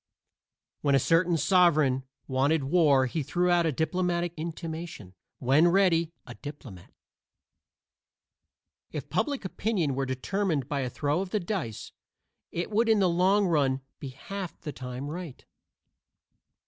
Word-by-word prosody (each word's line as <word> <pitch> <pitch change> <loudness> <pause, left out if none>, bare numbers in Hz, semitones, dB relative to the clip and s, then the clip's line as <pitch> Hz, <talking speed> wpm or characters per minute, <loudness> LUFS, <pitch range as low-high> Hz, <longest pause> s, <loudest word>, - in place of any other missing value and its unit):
When 140 -2 +3
a - - +5
certain 165 +5 +3
sovereign 155 -5 +3 0.2
wanted 140 +3 +1
war 140 -3 +4
he 155 +5 -2
threw 175 +5 +1
out 170 -1 +3
a - - +1
diplomatic 175 +3 -1
intimation; 165 - -6 0.2
when 140 +6 +4
ready, 170 -3 +3
a 120 - -9
diplomat. 125 - -10 2.0
If - - -6
public 285 -8 -1
opinion 190 -6 -1
were 135 +1 -2
determined 150 +2 -1
by 145 -1 -2
a 130 -2 -1
throw 145 +6 -1
of 195 - -4
the 210 - 0
dice, 170 - -4 0.6
it 175 +5 -3
would 225 +2 +2
in 220 - +5
the 195 -2 +3
long 185 +4 +3
run 140 -6 +1 0.2
be 140 - -6
half 185 +7 -7
the 150 - -5
time 125 +2 -6
right. 165 -2 -7
160 Hz, 135 wpm, -28 LUFS, 135-180 Hz, 2.0 s, a